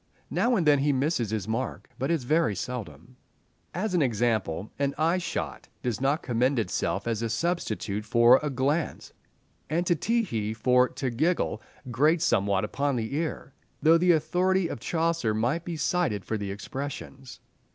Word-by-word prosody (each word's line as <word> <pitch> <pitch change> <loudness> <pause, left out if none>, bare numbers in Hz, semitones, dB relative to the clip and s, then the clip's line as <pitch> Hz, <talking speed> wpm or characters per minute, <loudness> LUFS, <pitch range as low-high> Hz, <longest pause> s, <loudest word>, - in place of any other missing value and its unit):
Now 240 +1 +2
and 180 -7 +1
then 145 -2 +5
he 145 +2 +2
misses 135 -4 0
his 110 -3 -3
mark, 115 +4 -3
but 135 - -1
it 170 - +3
is 150 - -4
very 135 -5 +2
seldom. 125 +2 -7 0.5
As 185 +4 -2
an 175 - +3
example, 110 - 0
an 140 -1 0
"eye 165 +4 +2
shot" 175 - -4 0.2
does 120 -1 -2
not 140 +3 +1
commend 125 +3 +1
itself 100 -1 -1
as 115 -2 -1
a 115 - -1
substitute 115 - -2
for 120 +3 +5
"a 150 - -2
glance," 140 +4 -1 0.6
and 170 +4 0
"to 175 - +3
tee 230 +8 +1
hee" 110 - -3
for 125 +2 +3
"to 130 -3 -3
giggle" 160 +9 0 0.3
grates 155 +7 +3
somewhat 100 0 +2
upon 140 +5 -1
the 115 +1 -3
ear, 150 -3 -3 0.3
though 165 +2 +6
the 175 0 +5
authority 180 +4 +1
of 130 - -5
Chaucer 165 -6 0
might 125 +10 0
be 170 -2 -5
cited 150 - 0
for 110 - -2
the 100 -2 -3
expressions. 130 +5 -7
135 Hz, 170 wpm, -27 LUFS, 115-165 Hz, 0.6 s, though